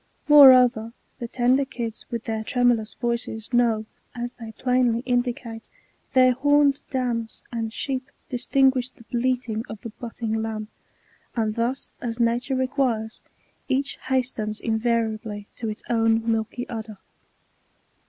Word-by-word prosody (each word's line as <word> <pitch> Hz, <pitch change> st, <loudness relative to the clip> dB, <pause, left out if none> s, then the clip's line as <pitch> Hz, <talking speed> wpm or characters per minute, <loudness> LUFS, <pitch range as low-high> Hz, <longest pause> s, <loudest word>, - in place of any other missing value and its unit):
Moreover, 255 Hz, -6 st, +7 dB, 0.3 s
the 240 Hz, -, -4 dB
tender 250 Hz, +3 st, +2 dB
kids, 235 Hz, -4 st, -6 dB
with 235 Hz, -2 st, -4 dB
their 220 Hz, -1 st, -3 dB
tremulous 240 Hz, -3 st, +1 dB
voices, 235 Hz, -1 st, -3 dB
know, 230 Hz, -3 st, +3 dB, 0.3 s
as 240 Hz, 0 st, -4 dB
they 225 Hz, -2 st, -9 dB
plainly 250 Hz, -1 st, +1 dB
indicate, 245 Hz, -2 st, -2 dB, 0.4 s
their 255 Hz, -1 st, +6 dB
homed 285 Hz, +2 st, +3 dB
dams, 240 Hz, -4 st, -2 dB
and 225 Hz, -1 st, -2 dB
sheep 265 Hz, +2 st, -3 dB, 0.2 s
distinguish 260 Hz, 0 st, +2 dB
the 250 Hz, -, -19 dB
bleating 240 Hz, -2 st, -1 dB
of 215 Hz, -, -7 dB
the 230 Hz, -, -7 dB
butting 230 Hz, -1 st, -5 dB
lamb; 220 Hz, -1 st, -3 dB, 0.7 s
and 220 Hz, -2 st, 0 dB
thus, 240 Hz, +4 st, -2 dB
as 235 Hz, -1 st, -4 dB
nature 240 Hz, +3 st, +1 dB
requires, 255 Hz, -4 st, -1 dB, 0.5 s
each 275 Hz, +1 st, 0 dB
hastens 245 Hz, -5 st, -1 dB
invariably 220 Hz, -2 st, -1 dB
to 225 Hz, -, -3 dB
its 215 Hz, -, -6 dB
own 225 Hz, -1 st, +2 dB
milky 225 Hz, +2 st, -2 dB
udder. 220 Hz, -2 st, -6 dB
235 Hz, 125 wpm, -24 LUFS, 225-255 Hz, 0.7 s, Moreover